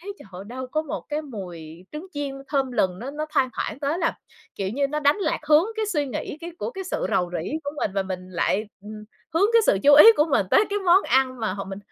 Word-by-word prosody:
thấy, 400 +4 -7
trời - - -14
ơi, 185 +2 -8
đâu 255 +3 -6
có 310 +5 -2
một 300 - -5
cái 300 +1 -2
mùi 175 - -9
trứng 305 +4 -7
chiên 285 -2 -4
thơm 270 -3 0
lừng, 185 -6 0
nó 255 +4 -6
nó 305 +2 -4
thoang 260 -1 +1
thoảng 225 - -4
tới 295 +4 -1
là, 330 -2 -1 0.4
kiểu 195 - -3
như, 275 +7 0
nó 300 +2 -3
đánh 285 0 +3
lạc 405 - -1
hướng 305 +3 +6
cái 435 -1 -1
suy 300 -8 -1
nghĩ 270 - -5
cái 340 +1 -6
của - - -3
cái 385 -5 -7
sự 370 - -2
rầu 175 -1 +1
rĩ 165 -1 -3
của 285 - -2
mình, 250 - -1
và 195 - +1
mình 185 -1 -6
lại, 190 +3 0 0.2
ừm, 210 +1 -10 0.3
hướng 360 +5 +4
cái 460 -1 +6
sự 195 - +4
chú 285 0 +7
ý 295 - +10
của 300 - +3
mình 205 -8 +2
tới 415 - +5
cái 410 - 0
món 380 0 +4
ăn 255 0 +1
mà 220 -4 -1
họ 195 -1 -5
mình 195 0 -7
275 Hz, 265 wpm, -24 LUFS, 200-310 Hz, 0.4 s, ý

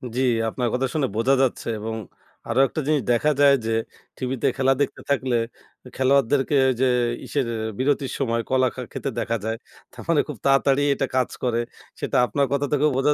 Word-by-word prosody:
জ্বি, 130 - +1 0.3
আপনার 125 +2 -2
কথা 130 +1 +1
শুনে 150 -4 +1
বোঝা 115 +5 +3
যাচ্ছে 130 -2 0
এবং 110 +1 -4 0.5
আরও 115 +3 +1
একটা 155 - -4
জিনিস 150 -2 +2
দেখা 120 +6 +3
যায় 140 -1 +7
যে 115 - -1 0.5
টিভিতে 130 -1 -1
খেলা 135 0 +3
দেখতে 140 - -1
থাকলে 130 -3 +1 0.6
খেলোয়াড়দেরকে 135 +1 +2
ওইযে 130 +1 +1 0.4
ইসের 140 -4 -1 0.3
বিরতির 135 0 0
সময় 115 -3 0
কলা 130 0 +3
খা 130 - -5
খেতে 135 - -3
দেখা 115 0 -1
যায় 110 0 -2 0.3
তার - - -11
মানে 160 -3 +4
খুব 150 - -6
তাড়াতাড়ি 135 0 +3
এটা 135 - -1
কাজ 130 -1 +2
করে। 120 -2 +1 0.4
সেটা - - -1
আপনার 140 +5 +1
কথা 140 0 +1
থেকেও 150 +1 +3
বোঝা 140 +2 +3
135 Hz, 180 wpm, -23 LUFS, 125-140 Hz, 0.6 s, যায়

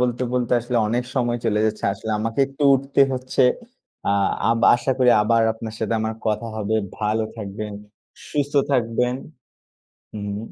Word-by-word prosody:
বলতে, 125 0 0
বলতে 125 -1 0
আসলে 120 +1 -3
অনেক 120 +2 0
সময় 120 -2 +1
চলে 105 -2 +1
যাচ্ছে। 110 0 -3
আসলে 110 +2 -6
আমাকে 115 +4 -1
একটু 135 +2 -7
উঠতে 135 +1 0
হচ্ছে। 130 +1 0 0.7
আ - - +3 0.4
আব 115 - +2 0.2
আশা 120 +2 -1
করি 125 -1 +5
আবার 115 +1 +3
আপনার 110 0 -7
সাথে 110 0 -1
আমার 110 0 -2
কথা 110 +2 0
হবে। 110 +1 0 0.2
ভালো 110 +1 0
থাকবেন, 105 0 -6 0.6
সুস্থ 145 -1 -1 0.2
থাকবেন। 125 0 +1 1.0
হুম। 100 -1 -4
115 Hz, 155 wpm, -22 LUFS, 110-125 Hz, 1.0 s, করি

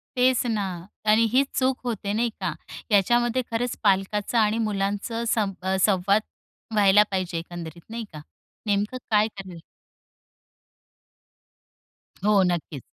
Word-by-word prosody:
तेच 255 0 +3
ना 220 -4 0 0.4
कारण 215 +1 +5
हीच 270 +3 +3
चूक 260 0 +1
होते, 210 -4 -2
नाही 235 +2 +1
का? - - -1 0.4
याच्यामध्ये 240 +4 +3
खरंच 235 +2 -1
पालकांचा 205 +3 +1
आणि 215 0 +2
मुलांचं 210 +2 -2
सं 210 -3 +1 0.3
संवाद 200 +1 +2 0.5
व्हायला 205 0 +6
पाहिजे 185 -3 -2
एकंदरीत 170 0 -7
नाही 230 +1 -5
का? 150 - -8 0.4
नेमकं 205 +4 0
काय 215 -1 +4
करेल? 190 -5 -10 2.7
हो 210 -2 +5
नक्कीच. 155 -5 -4
210 Hz, 115 wpm, -25 LUFS, 195-230 Hz, 2.7 s, व्हायला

